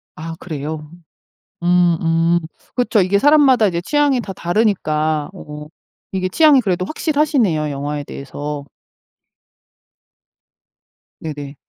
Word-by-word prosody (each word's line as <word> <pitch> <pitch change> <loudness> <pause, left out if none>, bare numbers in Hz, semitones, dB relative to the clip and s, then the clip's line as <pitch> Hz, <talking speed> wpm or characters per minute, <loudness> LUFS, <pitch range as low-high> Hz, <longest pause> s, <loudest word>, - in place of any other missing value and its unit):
아 165 +1 -7
그래요. 150 -1 -6 0.7
음. 175 -1 +3
음. 165 +1 +2 0.4
그쵸. 245 -4 +2
이게 190 +2 +2
사람마다 280 -5 +5
이제 170 -3 -1
취향이 290 +4 +2
다 195 - -7
다르니까. 155 -6 0
어 150 -5 -9 0.4
이게 185 -1 -1
취향이 295 - +5
그래도 185 -4 -1
확실하시네요 280 - 0
영화에 145 +1 -4
대해서. 145 +1 -6 2.6
네네. 145 -2 -7
175 Hz, 240 characters per minute, -19 LUFS, 150-225 Hz, 2.6 s, 사람마다